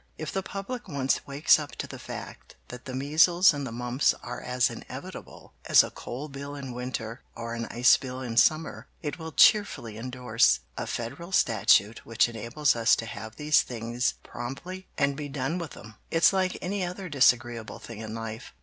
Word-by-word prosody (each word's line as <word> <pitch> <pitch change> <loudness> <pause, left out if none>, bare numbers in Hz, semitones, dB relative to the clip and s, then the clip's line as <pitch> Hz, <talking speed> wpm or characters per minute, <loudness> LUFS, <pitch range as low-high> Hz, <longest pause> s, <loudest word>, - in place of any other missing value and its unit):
If 155 - -5
the 195 - -1
public 200 +6 -6
once 135 -6 -1
wakes 140 +3 +4
up 150 -1 -7
to - - -5
the - - -9
fact - - -9
that 125 0 -9
the 130 - -5
measles 160 +6 +5
and 140 -2 -4
the - - -6
mumps 125 +3 +1
are 125 0 -6
as 125 0 +1
inevitable - - -9
as - - +7
a - - -6
coal 135 +5 -7
bill 140 0 -7
in 135 -3 -6
winter, 125 -1 -5
or 115 0 -5
an 115 0 -4
ice 125 +1 +5
bill 130 -1 -6
in 120 -3 -5
summer, 155 +6 +2 0.2
it 150 +3 -4
will 160 0 -6
cheerfully 145 - +4
indorse 125 -1 +2
a - - -4
Federal 135 +10 -5
Statute 110 - +3
which 115 +1 +2
enables 120 +5 0
us 115 -1 +4
to 115 - -5
have 110 0 -8
these 150 0 +3
things 120 +1 -2
promptly 135 +11 -7
and 140 -2 +2
be 145 0 -5
done 140 +5 -2
with 165 -5 -7
'em. 110 +1 -11 0.2
It's 165 +4 +4
like 185 -1 0
any 195 +1 -1
other 180 +2 -5
disagreeable 120 -6 +2
thing 115 -2 -10
in 110 0 -6
life. 115 -1 -7
130 Hz, 185 wpm, -27 LUFS, 115-155 Hz, 0.2 s, as